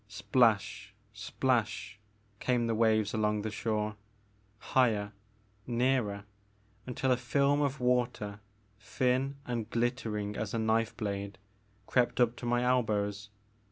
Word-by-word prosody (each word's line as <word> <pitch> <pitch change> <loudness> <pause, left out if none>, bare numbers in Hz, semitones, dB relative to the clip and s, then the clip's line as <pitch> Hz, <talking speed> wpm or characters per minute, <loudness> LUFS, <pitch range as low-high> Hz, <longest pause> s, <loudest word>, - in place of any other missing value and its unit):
Splash, 105 -1 +1 0.2
splash, 110 0 -1 0.4
came 125 -2 +1
the 115 - 0
waves 110 -2 +2
along 105 -1 0
the 110 - -3
shore, 105 0 -2 0.6
higher, 110 -3 +1 0.6
nearer, 120 -4 +1 0.6
until 130 +1 0
a 125 - +4
film 140 +3 +2
of 140 -1 0
water, 120 -5 0 0.4
thin 130 +5 0
and 120 -2 -3
glittering 115 -4 -1
as 110 +1 -3
a - - +1
knife 110 0 +1
blade, 100 -1 -4 0.5
crept 125 +2 +1
up 120 -1 +3
to 120 - -5
my 120 +1 +2
elbows. 105 -5 0
115 Hz, 120 wpm, -31 LUFS, 105-125 Hz, 0.6 s, a